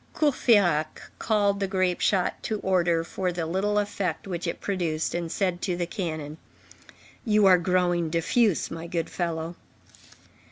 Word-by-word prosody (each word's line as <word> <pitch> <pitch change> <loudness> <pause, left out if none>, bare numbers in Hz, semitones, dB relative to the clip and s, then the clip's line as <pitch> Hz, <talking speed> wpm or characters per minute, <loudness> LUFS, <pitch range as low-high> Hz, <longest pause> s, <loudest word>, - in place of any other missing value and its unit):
Courfeyrac 205 - +2 0.2
called 205 -2 +1
the 195 - 0
grape 185 -2 0
shot 190 -3 +1
to 215 - -2
order 175 -3 +2
for 180 +2 -2
the 170 -2 -3
little 195 +5 0
effect 200 -2 -2
which 175 -2 -4
it 170 - -3
produced, 170 -5 -2
and 170 -1 -3
said 180 -3 -1
to 180 -3 -1
the 175 - -1
cannon: 160 -5 -5 0.8
"You 215 -3 +3
are 185 -2 +7
growing 175 -2 +1
diffuse, 175 +5 +1
my 165 +1 -6
good 170 -1 -3
fellow." 165 -1 -3
180 Hz, 150 wpm, -26 LUFS, 170-200 Hz, 0.8 s, are